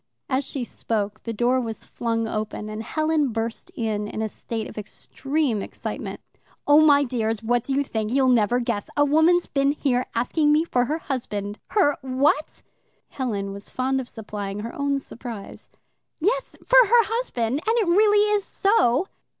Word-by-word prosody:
As 265 +1 0
she 270 -1 -4
spoke, 215 -3 -3
the 230 - -2
door 245 +3 +2
was 225 -2 -5
flung 230 -1 -2
open, 215 0 -4
and 215 +1 -5
Helen 310 +4 +1
burst 225 +7 -4
in 215 -5 -2
in 215 +1 -4
a 220 - -2
state 225 +1 -5
of - - -11
extreme 265 +3 -2
excitement. - - -6 0.4
"Oh, 290 +1 +6
my 290 -2 +6
dears, 225 -4 -2
what 240 +1 +1
do 270 - -2
you 285 - +2
think? 220 -4 -3
You'll 265 0 +3
never 240 -1 +3
guess. 210 -4 -2
A 290 - +5
woman's 320 +4 +4
been 275 0 +1
here 255 -4 0
asking 295 +6 +2
me 305 +2 +4
for 250 -7 +1
her 305 +5 -1
husband. 210 -9 -4
Her 360 -9 +2
WHAT?" 270 +3 0 0.5
(Helen 205 -7 -3
was 200 0 -10
fond 265 +1 0
of 245 - -10
supplying 205 -2 -5
her 230 +2 -6
own 280 -1 0
surprise.) 235 -6 -8 0.5
"Yes, 475 +9 -1
for - - +7
her 470 +2 +6
husband, 295 - -1
and 450 +2 +3
it 435 -5 +2
really 415 +3 +4
is 405 - 0
so." 380 - +2
255 Hz, 175 wpm, -24 LUFS, 225-300 Hz, 0.5 s, for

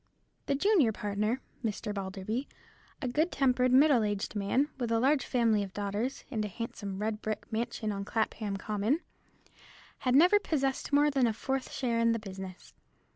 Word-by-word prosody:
The 280 - +2
junior 335 - +4
partner, 210 +4 -1 0.2
Mr. 210 -1 -2
Balderby, 200 +6 -3 0.6
a - - 0
good 305 +8 +1
tempered, 255 -2 +2
middle 270 -1 +6
aged 205 0 -2
man, 210 +8 +1
with 240 -2 -2
a 225 - +3
large 270 +3 +3
family 230 -4 +2
of 195 -2 -5
daughters, 205 +6 -2
and 220 -4 -1
a - - -2
handsome 200 -2 -5
red 215 +1 -2
brick 215 -1 -3
mansion 225 -1 -2
on 200 -1 -3
Clapham 215 -1 -2
Common, 215 - 0 1.0
had 255 -1 +1
never 360 +8 +7
possessed 275 -8 -1
more 290 +1 +4
than 265 -3 +3
a 225 - 0
fourth 265 +4 -3
share 240 -3 -1
in 230 0 +4
the - - 0
business. 190 -3 -9
230 Hz, 170 wpm, -30 LUFS, 205-265 Hz, 1.0 s, never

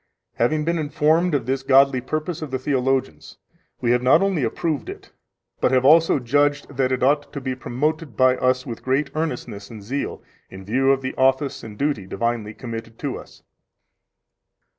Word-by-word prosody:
11 - - +3
Having 155 -1 -1
been 170 0 0
informed 155 +3 +2
of 130 -5 -1
this 135 +1 -1
godly 135 -1 +4
purpose 155 +5 -3
of 155 - -5
the 130 - -2
theologians, 130 - -1 0.4
we 120 - +2
have 125 0 +3
not 125 +9 +5
only 190 -8 0
approved 150 +6 -2
it, - - -10 0.5
but - - +3
have 130 0 +3
also 160 +3 +6
judged 145 +3 0
that 130 0 +1
it 130 -1 0
ought 145 +2 +2
to 140 - -5
be 130 -1 -3
promoted 145 +3 -3
by 130 -1 +5
us 130 0 +1
with 120 -4 -7
great 140 +2 0
earnestness 125 -10 -4
and 110 -3 -10
zeal, 135 +7 -4 0.3
in 95 0 -11
view 130 +6 +1
of 135 -1 0
the 130 - -3
office 135 +1 +1
and 105 -2 -9
duty 140 -9 -1
divinely 115 -1 -2
committed 115 -2 -7
to - - -3
us. - - -12
130 Hz, 185 wpm, -22 LUFS, 125-145 Hz, 0.5 s, also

